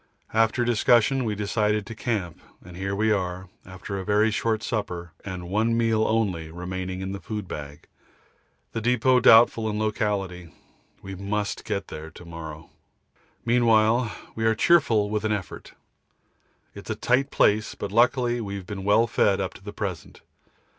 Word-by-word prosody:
After 115 Hz, +2 st, +2 dB
discussion 120 Hz, +2 st, +3 dB
we 105 Hz, -2 st, -1 dB
decided 105 Hz, 0 st, 0 dB
to 115 Hz, -, -7 dB
camp, 105 Hz, -7 st, -3 dB, 0.3 s
and 90 Hz, -1 st, -11 dB
here 95 Hz, +2 st, -3 dB
we 110 Hz, +2 st, +1 dB
are, 95 Hz, -2 st, -2 dB, 0.2 s
after 95 Hz, +2 st, -6 dB
a -, -, -4 dB
very 105 Hz, +2 st, +2 dB
short 110 Hz, 0 st, -1 dB
supper 90 Hz, -7 st, -3 dB
and 90 Hz, -3 st, -6 dB
one 110 Hz, +5 st, +1 dB
meal 115 Hz, -2 st, +2 dB
only 95 Hz, -8 st, 0 dB
remaining 95 Hz, +2 st, -5 dB
in 95 Hz, 0 st, -4 dB
the 100 Hz, -, -5 dB
food 105 Hz, -3 st, -5 dB
bag; 75 Hz, -2 st, -8 dB, 0.9 s
the 115 Hz, -, -3 dB
depot 125 Hz, +2 st, +3 dB
doubtful 115 Hz, -1 st, +6 dB
in 105 Hz, -, -2 dB
locality. 100 Hz, -5 st, -2 dB, 0.5 s
We 95 Hz, -, -7 dB
must 100 Hz, +2 st, -3 dB
get 100 Hz, -2 st, -3 dB
there 80 Hz, +1 st, -7 dB
to 85 Hz, +2 st, -14 dB
morrow. 80 Hz, -2 st, -9 dB, 0.7 s
Meanwhile 115 Hz, -1 st, +3 dB, 0.2 s
we 110 Hz, -, -4 dB
are 110 Hz, 0 st, +3 dB
cheerful 120 Hz, -8 st, +3 dB
with 105 Hz, 0 st, -1 dB
an 110 Hz, -, 0 dB
effort. 100 Hz, -3 st, -6 dB, 1.0 s
It's -, -, -11 dB
a -, -, -1 dB
tight 130 Hz, +3 st, +1 dB
place, 110 Hz, -3 st, +2 dB
but 100 Hz, -, -5 dB
luckily 120 Hz, +1 st, +2 dB
we've 100 Hz, -3 st, -5 dB
been 95 Hz, 0 st, -6 dB
well 105 Hz, +3 st, +4 dB
fed 100 Hz, -4 st, +2 dB
up 95 Hz, -1 st, -3 dB
to -, -, -15 dB
the 105 Hz, -, -7 dB
present. 100 Hz, -5 st, -6 dB
105 Hz, 160 wpm, -25 LUFS, 95-115 Hz, 1.0 s, doubtful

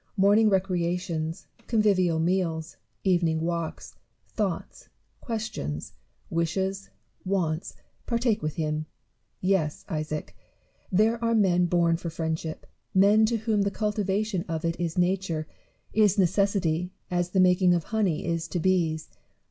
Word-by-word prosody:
Morning 205 Hz, +3 st, +5 dB
recreations, 175 Hz, -3 st, -1 dB, 0.2 s
convivial 195 Hz, -7 st, +3 dB
meals, 165 Hz, -1 st, -1 dB, 0.3 s
evening 170 Hz, -4 st, +2 dB
walks, 165 Hz, 0 st, -4 dB, 0.3 s
thoughts, 200 Hz, -6 st, -3 dB, 0.3 s
questions, 215 Hz, -, -4 dB, 0.4 s
wishes, 190 Hz, +4 st, -1 dB, 0.3 s
wants, 180 Hz, -4 st, -1 dB, 0.3 s
partake 235 Hz, -2 st, +1 dB
with 155 Hz, 0 st, -3 dB
him. 155 Hz, -1 st, -2 dB, 0.5 s
Yes, 185 Hz, -5 st, 0 dB
Isaac! 155 Hz, -1 st, -4 dB, 0.6 s
there 225 Hz, +5 st, +2 dB
are 230 Hz, 0 st, +2 dB
men 180 Hz, -4 st, +3 dB
born 170 Hz, -1 st, +2 dB
for 170 Hz, 0 st, -5 dB
friendship; 160 Hz, -1 st, -3 dB, 0.3 s
men 205 Hz, +3 st, +6 dB
to 230 Hz, +1 st, +1 dB
whom 220 Hz, -1 st, 0 dB
the 200 Hz, -, +2 dB
cultivation 210 Hz, -2 st, -1 dB
of 165 Hz, 0 st, -3 dB
it 165 Hz, 0 st, 0 dB
is 170 Hz, -1 st, -2 dB
nature, 180 Hz, -3 st, 0 dB, 0.5 s
is 210 Hz, -2 st, +4 dB
necessity, 180 Hz, -2 st, +2 dB, 0.2 s
as 175 Hz, 0 st, 0 dB
the 190 Hz, -, +1 dB
making 180 Hz, -1 st, +5 dB
of 170 Hz, -, -1 dB
honey 195 Hz, -6 st, 0 dB
is 165 Hz, -1 st, -1 dB
to 175 Hz, -, -2 dB
bees. 165 Hz, -3 st, +1 dB
180 Hz, 125 wpm, -27 LUFS, 165-200 Hz, 0.6 s, men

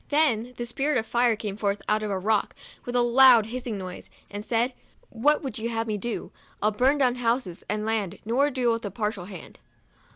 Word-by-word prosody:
Then 250 Hz, -6 st, +2 dB
the 240 Hz, -, -3 dB
Spirit 275 Hz, +4 st, 0 dB
of 225 Hz, -, -1 dB
Fire 240 Hz, 0 st, +2 dB
came 210 Hz, -2 st, -5 dB
forth 200 Hz, -1 st, -2 dB
out 215 Hz, 0 st, +2 dB
of 215 Hz, -, -3 dB
a 195 Hz, -, -1 dB
rock 210 Hz, +2 st, 0 dB, 0.3 s
with 245 Hz, -, -4 dB
a 245 Hz, -, +4 dB
loud 240 Hz, -2 st, +7 dB
hissing 235 Hz, -1 st, -5 dB
noise, 185 Hz, -1 st, -8 dB, 0.2 s
and 205 Hz, 0 st, -5 dB
said 235 Hz, +3 st, 0 dB, 0.2 s
" -, -, -34 dB, 0.2 s
What 295 Hz, +1 st, +4 dB
would 260 Hz, -3 st, -4 dB
ye 225 Hz, -, -2 dB
have 225 Hz, -1 st, -2 dB
me 215 Hz, -2 st, -2 dB
do 235 Hz, +2 st, -4 dB
% -, -, -31 dB
I'll 215 Hz, -, +2 dB
burn 255 Hz, +7 st, +2 dB
down 255 Hz, -3 st, +2 dB
houses 230 Hz, -7 st, -1 dB
and 210 Hz, +1 st, -1 dB
land, 210 Hz, -4 st, -1 dB
nor 260 Hz, +6 st, +2 dB
deal 250 Hz, -3 st, +1 dB
with 230 Hz, 0 st, -2 dB
a 205 Hz, -, -3 dB
partial 210 Hz, -2 st, -3 dB
hand." 185 Hz, -3 st, -11 dB
230 Hz, 225 wpm, -26 LUFS, 210-250 Hz, 0.3 s, loud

